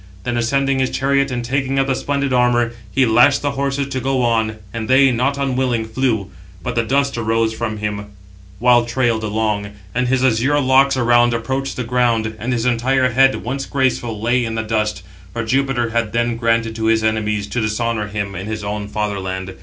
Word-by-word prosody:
Then 120 +3 -2
ascending 135 +3 +1
his 130 - +1
chariot, 140 0 +1
and 120 -2 -3
taking 135 +2 -1
up 135 - +3
the 135 - 0
splendid 140 0 -1
armour, 120 -1 +2 0.2
he 135 +3 +3
lashed 125 +6 +4
(the 145 - 0
horses) 140 0 -1
to 130 - -2
go 130 0 0
on, 110 -2 +1 0.2
and 115 -2 -4
they, 135 +1 +5
not 130 +4 0
unwilling, 130 -4 0
flew. 110 -4 -1 0.3
But - - -3
the 115 - +1
dust 135 +2 0
arose 115 0 0
from 110 -1 -3
him 105 -1 -4 0.5
while 120 +2 +4
trailed 120 -2 0
along, 105 -1 -1 0.3
and 125 +1 0
his 130 +1 +2
azure 130 +4 +2
locks 135 0 +3
around 120 -1 +3
approached 135 +3 -3
[the 125 - -3
ground], 120 -2 +1
714 110 -1 -6
and 125 - -1
his 120 -1 -1
entire 125 +2 +2
head, 135 +2 +3
once 135 +3 -4
graceful, 125 -5 -1
lay 120 +3 +1
in 115 -1 -3
the 110 - -1
dust; 105 -3 -1 0.3
for 115 - -2
Jupiter 125 0 0
had 115 -2 -1
then 120 0 0
granted 115 -1 0
to 110 - -2
his 110 0 +2
enemies, 105 -2 0
to 115 +4 -3
dishonour 110 0 -1
him 100 -1 -4
in 95 +2 -6
his 110 -1 -4
own 105 0 -4
father 105 -1 -2
land. 95 0 -5
120 Hz, 200 wpm, -19 LUFS, 110-130 Hz, 0.5 s, they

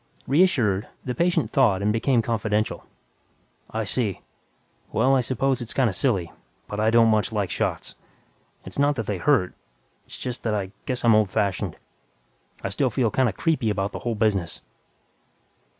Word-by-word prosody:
Reassured, 130 - +2 0.2
the 125 - -2
patient 175 +7 +1
thawed 110 - +3
and 105 +1 +2
became 115 +1 +2
confidential, 110 -2 -1 0.8
"I 110 0 -2
see. 105 -1 -1 0.7
Well, 135 +1 +3
I 130 - +3
suppose 130 +1 0
it's 120 - -6
kinda 125 -7 +2
silly, 95 - 0 0.4
but 105 - -5
I 110 +1 +3
don't 115 0 +5
much 110 +1 +2
like 105 -3 -1
shots. - - -2 0.7
It's - - -6
not 145 +1 +3
that 115 -4 -3
they 100 -3 -3
hurt... 130 -9 +2 0.5
it's - - -7
just 125 -1 -4
that 110 -2 -1
I 95 -2 -3 0.2
guess 125 -2 -1
I'm 115 - +6
old 110 -2 +3
fashioned. 100 -1 -1 0.9
I - - -1
still - - +1
feel 120 -4 0
kinda 130 -4 +2
'creepy' 140 - 0
about 100 -1 -1
the - - -6
whole 120 -2 -2
business." 105 -5 0
115 Hz, 165 wpm, -24 LUFS, 105-130 Hz, 0.9 s, I'm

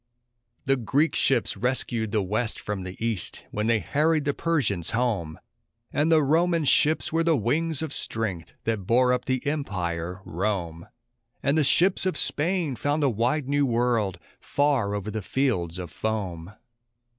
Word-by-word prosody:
The 135 +1 +2
Greek 140 +6 +1
ships 135 - +2
rescued 120 -3 -1
the 105 -2 +1
West 110 +4 -2
from 105 -2 -4
the 90 0 -7
East, 110 -5 -3
when 105 +1 -1
they 115 -1 +4
harried 150 - +1
the 140 - +1
Persians 135 - 0
home; 105 -10 -1 0.6
And 155 +3 +2
the 155 -2 +5
Roman 165 +2 +2
ships 155 +3 +3
were 165 0 +2
the 165 -2 +3
wings 155 +6 0
of 155 -3 0
strength 100 -8 -2
that 110 -5 -2
bore 125 +1 +4
up 125 0 -2
the 130 -1 -1
empire, 90 - -3
Rome; 85 -3 -3 0.6
And 140 - +2
the 155 - +3
ships 180 +7 +3
or 185 - -1
Spain 165 -2 0
found 145 +4 0
a 135 - +3
wide 125 +6 0
new 145 0 +2
world 115 -6 +1 0.2
far 135 -8 +1
over 105 +1 -4
the 110 +1 -3
fields 95 -8 -1
of 90 -4 -6
foam. 95 -1 -4
120 Hz, 160 wpm, -26 LUFS, 100-145 Hz, 0.6 s, the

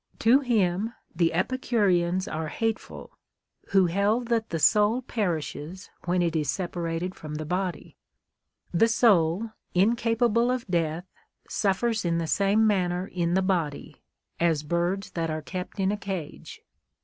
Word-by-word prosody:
To 235 +4 +5
him 220 -4 0 0.2
the 170 -2 +2
Epicureans 185 -3 +1
are 160 0 -3
hateful, 225 +7 -4 0.6
who 195 -2 +4
held 205 +7 +1
that 225 -2 0
the 165 - -2
soul 210 - +3
perislies 180 - -4
when 180 0 +1
it 170 -1 -1
is 150 -3 0
separated 175 +1 -2
from 155 -4 -8
the 155 +1 -4
body. 180 +2 -3 0.8
"The 200 +7 +4
soul, 215 -3 +3 0.2
incapable 230 +3 +2
of 255 -1 -1
death, 170 -1 -1 0.4
suffers 215 +3 0
in 170 -1 0
the 165 - -1
same 200 +5 +2
manner 180 -3 +1
in 175 -2 -1
the 190 - +2
body, 170 -7 -2 0.4
as 165 -3 +2
birds 175 +5 -1
tliat 165 -2 -2
are 155 0 -3
kept 180 +4 -6
in 190 0 +2
a 210 - -2
cage." 190 -7 -6
185 Hz, 140 wpm, -26 LUFS, 170-220 Hz, 0.8 s, To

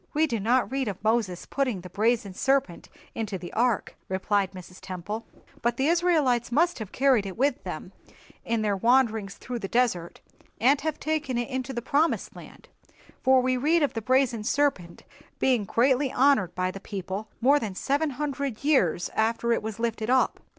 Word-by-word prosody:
"We 310 +1 +4
do 235 -7 -2
not 245 +6 +1
read 265 -2 -1
of 200 -1 -5
Moses 215 -5 0
putting 255 -9 -1
the 180 - -10
brazen 215 -2 0
serpent 265 -5 0 0.2
into 215 -4 -3
the 175 -1 -9
ark," 235 -2 0
replied 190 +1 0
Mrs. 185 -1 -11
Temple; 195 +5 -6 0.3
"but 240 +1 0
the 265 - +1
Israelites 310 -8 +2
must 335 +4 +2
have 215 -3 -6
carried 260 -7 +2
it 190 - -7
with 275 +2 +1
them - - -6 0.5
in 230 -1 -1
their 205 -2 +1
wanderings 225 -2 +2
through 245 -1 -6
the 195 - -4
desert, 205 -8 0 0.4
and 265 +6 +4
have 310 0 -3
taken 305 -5 -1
it 240 +2 -2
into 260 0 -3
the 240 -3 -4
Promised 300 +5 0
Land, - - -13 0.5
for 260 0 +5
we 255 0 +1
read 310 +5 +2
of 285 - 0
the 225 - -3
brazen 255 -2 +1
serpent 250 -9 -1 0.3
being 245 -6 +2
greatly 260 +5 +2
honored 255 -10 +3
by 185 0 -1
the 195 - -8
people 195 +1 -5
more 280 +4 +4
than 210 -6 -5
seven 285 +9 0
hundred 280 -3 -4
years 185 - +2
after 230 +1 +1
it - - 0
was 215 -1 -5
lifted 230 -1 -2
up." 260 0 +2
235 Hz, 180 wpm, -26 LUFS, 205-270 Hz, 0.5 s, for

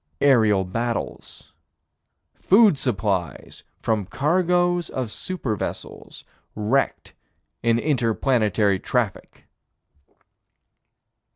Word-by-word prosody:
Aerial 110 -8 +4
battles. 115 +5 -5 0.8
Food 205 -2 +4
supplies 100 - -3 0.2
from 110 -4 -1
cargoes 175 - +1
of 125 -4 -4
super 140 -11 -4
vessels, - - -7 0.3
wrecked 110 +6 -1 0.5
in 115 0 +2
inter 120 -5 0
planetary 105 -6 +1
traffic. 115 -4 -3
120 Hz, 75 wpm, -23 LUFS, 105-145 Hz, 0.8 s, Aerial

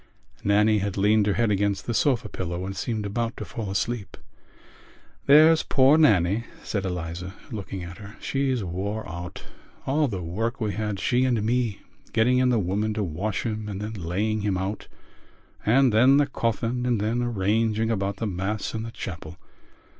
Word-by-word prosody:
Nannie 105 +1 +4
had 100 0 -3
leaned 105 +1 +3
her 100 - +2
head 115 -3 +2
against 100 -1 0
the 120 - -2
sofa 125 0 +2
pillow 90 0 -4
and 95 0 -5
seemed 110 +2 -2
about 115 +3 -2
to - - -5
fall 110 -4 -5
asleep. 105 +2 -3 1.1
"There's 155 +3 +7
poor 135 +2 +4
Nannie," 110 - +3 0.2
said 100 -2 -2
Eliza, 90 +1 -4 0.2
looking 100 -4 -5
at 90 +3 -9
her, 100 0 -10
"she's 135 -4 -1
wore 100 +5 -3
out. 85 +1 -7 0.4
All 145 +2 +2
the 95 -7 -4
work 115 +10 -2
we 105 -3 -1
had, 105 0 -3
she 125 +5 +2
and 120 -5 +1
me, 115 -2 0 0.3
getting 125 +3 +3
in 130 0 +3
the 120 - +3
woman 105 +2 -1
to 105 - 0
wash 95 +5 -2
him 110 -2 -3
and 100 -1 -5
then 105 +2 -4
laying 105 +4 -1
him 100 -2 0
out 95 +3 -4 0.8
and 125 +1 +4
then 130 +5 +6
the 145 - +4
coffin 120 -2 -1
and 120 -3 +1
then 110 +4 0
arranging 110 0 +1
about 100 -2 -1
the 115 - -3
Mass 100 +2 -2
in 110 - -3
the 115 - -5
chapel. 90 -5 -7
105 Hz, 175 wpm, -25 LUFS, 95-120 Hz, 1.1 s, There's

